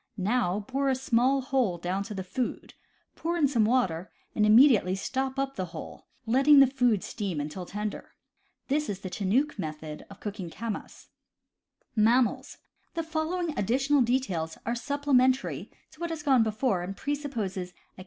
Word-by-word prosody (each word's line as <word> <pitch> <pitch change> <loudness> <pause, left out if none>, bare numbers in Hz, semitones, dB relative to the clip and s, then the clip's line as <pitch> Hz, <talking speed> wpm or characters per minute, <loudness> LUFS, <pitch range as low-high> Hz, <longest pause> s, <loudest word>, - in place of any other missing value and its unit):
Now 200 -1 +1
bore 275 +1 0
a 265 - +2
small 260 +1 +2
hole 255 -9 0
down 180 +3 -2
to 210 - -6
the 190 - -4
food, 250 +7 -4 0.4
pour 340 +1 -2
in 300 -4 +4
some 235 -6 +2
water, 195 -8 0 0.2
and 210 -1 +2
immediately 220 -5 +6
stop 265 +6 -2
up 275 0 -1
the 185 - -2
hole, - - -9 0.2
letting 275 +5 +6
the 275 - +9
food 245 -6 +1
steam 190 -7 -3
until 155 +5 -5
tender. 210 0 -5 0.5
This 300 +2 0
is 195 -1 -4
the 185 - -6
Chinook 225 +8 0
method 155 -2 -6
of 200 - -13
cooking 200 -4 -5
camass. 225 +4 -6 0.9
The 240 +8 0
following 325 +1 -2
additional 270 +7 +2
details 200 -11 0
are 235 - 0
supplementary 260 0 +1 0.2
to - - -19
what 340 0 -3
has 320 -2 -5
gone 270 -4 +4
before, 220 -2 0
and 195 +2 -6
presuppose 280 -9 -3
a - - -3
amma 180 - -5
s. - - -25
240 Hz, 165 wpm, -28 LUFS, 195-275 Hz, 0.9 s, the